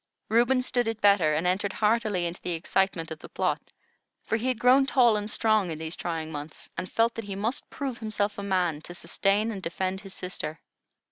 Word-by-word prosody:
Reuben 240 +3 +3
stood 245 -2 +1
it 225 -1 -2
better, 200 -8 +4
and 160 +3 0
entered 190 +2 +1
heartily 210 -4 +1
into 170 +1 -4
the 180 - -2
excitement 165 0 0
of 160 - -6
the - - -11
plot; - - 0 0.6
for - - -1
he 230 +3 -1
had 255 -2 +1
grown 255 +3 +5
tall 245 -5 +5
and 210 0 -2
strong 215 -4 +2
in 160 - -4
these 160 +1 -4
trying 160 -2 -3
months, 150 0 -7
and 185 - -5
felt 230 +1 +2
that 230 - -6
he 200 -1 -5
must 220 +6 -2
prove 270 -4 -4
himself 210 -2 -1
a - - -3
man 180 -6 0
to 175 +2 -9
sustain 205 +5 +1
and 200 -3 -5
defend 185 +2 -2
his 195 -2 -9
sister. 160 -4 -5
200 Hz, 210 wpm, -27 LUFS, 175-225 Hz, 0.6 s, grown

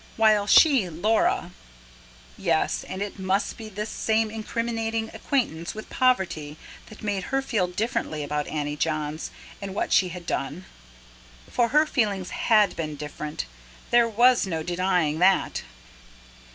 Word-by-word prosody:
While 215 -2 +4
she, 265 - +6
Laura... 180 +1 +1 0.8
Yes, - - 0
and 190 +2 -4
it 205 -1 -7
must 190 +2 0
be 220 -1 -9
this 210 +2 -5
same 220 0 +1
incriminating 225 0 -2
acquaintance 195 - -2
with 215 - -9
poverty 185 -12 +1 0.3
that 215 - -13
made 200 -3 -2
her 270 - 0
feel 210 -8 0
differently 180 -6 -2
about 150 0 -2
Annie 150 -1 -3
Johns 155 0 -2 0.3
and 195 -1 -6
what - - -1
she 185 - +4
had 175 0 -8
done. 160 +4 -3 0.9
For 240 -1 +2
her 300 +6 +4
feelings 205 - -1
HAD 215 -4 +3
been 155 -2 -4
different 150 - -5 0.5
there 240 -1 +5
was 240 0 +4
no 160 -3 -2
denying 175 -3 0
that. 185 +1 +3
195 Hz, 140 wpm, -25 LUFS, 165-225 Hz, 0.9 s, she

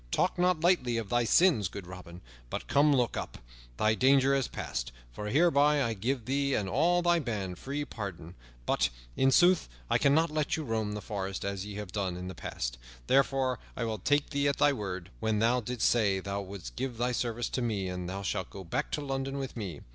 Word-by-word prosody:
Talk 185 - 0
not 180 -2 +2
lightly 165 -10 +2
of 110 -4 -3
thy 120 +1 +2
sins, 130 - +4
good 100 +1 -8
Robin. 90 -1 -10 0.3
But - - -4
come, 145 +2 +4
look 125 -5 +2
up. - - -5 0.4
Thy 110 0 +3
danger 135 +3 +4
is 135 -3 +1
past, - - -4 0.2
for 105 +12 -6
hereby 150 +1 +4
I 115 -2 0
give 115 +3 -2
thee 140 +1 +1
and 100 - -1
all 175 - +2
thy 175 0 +4
band 100 - -4
free 145 +2 -3
pardon. 90 - -7 0.3
But, - - +2 0.3
in 135 - +4
sooth, 175 - +4 0.2
I - - +4
cannot 155 +3 +3
let 155 0 0
you 160 - -3
roam 110 -4 -2
the 105 - -5
forest 95 -3 -4
as 100 0 -3
ye 105 - -7
have 105 -3 -6
done 95 -3 -2
in 90 0 -6
the - - -6
past; - - -5 0.3
therefore 135 - +2 0.2
I 125 - -1
will 110 -2 -2
take 145 +9 +1
thee 140 -1 +1
at 140 - +1
thy 145 - +4
word, 95 -7 -5
when 110 -1 0
thou 120 +3 +3
didst 125 +1 0
say 100 -5 +2
thou 100 +1 -3
wouldst 95 -11 -8
give 130 -3 -3
thy 120 +2 0
service 120 -1 -1
to 130 - -2
me, 105 -5 -1
and 90 -1 -4
thou 95 +1 -4
shalt 95 -1 -2
go 95 - -9
back 85 - -2
to 150 - -1
London 135 -1 -3
with 135 -2 -5
me. 95 -10 -5
115 Hz, 215 wpm, -30 LUFS, 100-140 Hz, 0.4 s, sins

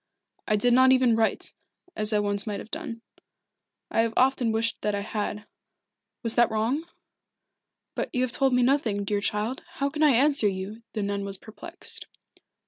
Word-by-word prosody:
I 215 - +3
did 240 +4 +3
not 260 +1 +6
even 255 -3 +4
write, 225 0 0 0.4
as 215 0 0
I 210 - +3
once 205 0 -1
might 205 -1 -3
have 225 - -11
done. 280 -8 -6 0.9
I 225 - +3
have 225 0 -1
often 255 -2 +3
wished 225 0 -1
that 210 0 0
I 200 - -2
had 210 0 -4 0.8
was 230 -1 0
that 240 -1 +4
wrong?" 230 +8 -1 1.1
"But - - -3
you 250 - 0
have 255 - -1
told 270 +1 +2
me 250 - +3
nothing, 240 -6 +1
dear 205 0 -1
child. 210 +5 -1
How 280 0 -1
can 300 - -4
I 305 - +6
answer 280 -3 +4
you?" 195 +3 -4
The 215 - -2
nun 200 0 -2
was 195 -1 -6
perplexed. 220 +3 -3
225 Hz, 180 wpm, -26 LUFS, 210-255 Hz, 1.1 s, not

